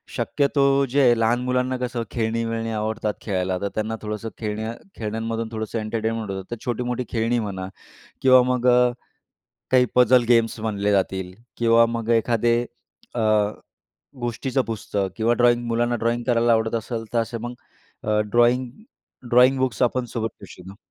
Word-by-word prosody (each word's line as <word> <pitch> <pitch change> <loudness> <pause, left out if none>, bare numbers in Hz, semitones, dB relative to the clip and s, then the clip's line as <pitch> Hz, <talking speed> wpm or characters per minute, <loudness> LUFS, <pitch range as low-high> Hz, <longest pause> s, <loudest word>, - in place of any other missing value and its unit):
शक्यतो 140 -1 +2
जे 140 +3 +2
आहे, 120 -3 +5
लहान 115 +2 +2
मुलांना 125 0 0
कसं 125 -1 -3
खेळणी-विळणी 115 0 -2
आवडतात 110 0 -2
खेळायला 95 -2 -1
तर 100 - -1
त्यांना 110 +1 -2
थोडंसं 105 +1 -4
खेळण्या-खेळण्यांमधून 110 - -4
थोडंसं 110 0 -3
एंटरटेनमेंट 110 0 -3
होतं 95 -1 -6
तर - - -1
छोटी-मोठी 125 +1 -2
खेळणी 115 +1 0
म्हणा 95 -4 -4 0.5
किंवा 130 -1 +7
मग 125 -1 +1
अ, 125 0 +5 0.8
काही 130 -1 +5
पजल 125 0 +5
गेम्स 115 -1 +3
म्हणले 105 -2 -1
जातील, 95 -2 -1 0.2
किंवा 115 0 +5
मग 115 -1 -4
एखादे 115 +1 +1 0.6
अ, - - -1 1.0
गोष्टीचं 125 +3 -1
पुस्तक 100 -3 -2
किंवा 115 +2 +2
ड्रॉईंग 120 0 +3
मुलांना 120 +1 +1
ड्रॉईंग 115 +1 -1
करायला 120 -1 +3
आवडत 110 0 +1
असेल 115 0 -4
तर 120 - +3
असे 115 +1 -2
मग 120 +2 -6 0.5
अ, 105 0 +1
ड्रॉईंग 120 +4 +2 0.6
ड्रॉइंग 125 +3 +5
बुक्स 130 -1 -1
आपण 125 +1 0
सोबत 115 -1 -3
घेऊ - - -9
शकतो. 95 +2 -12
115 Hz, 150 wpm, -23 LUFS, 110-120 Hz, 1.0 s, किंवा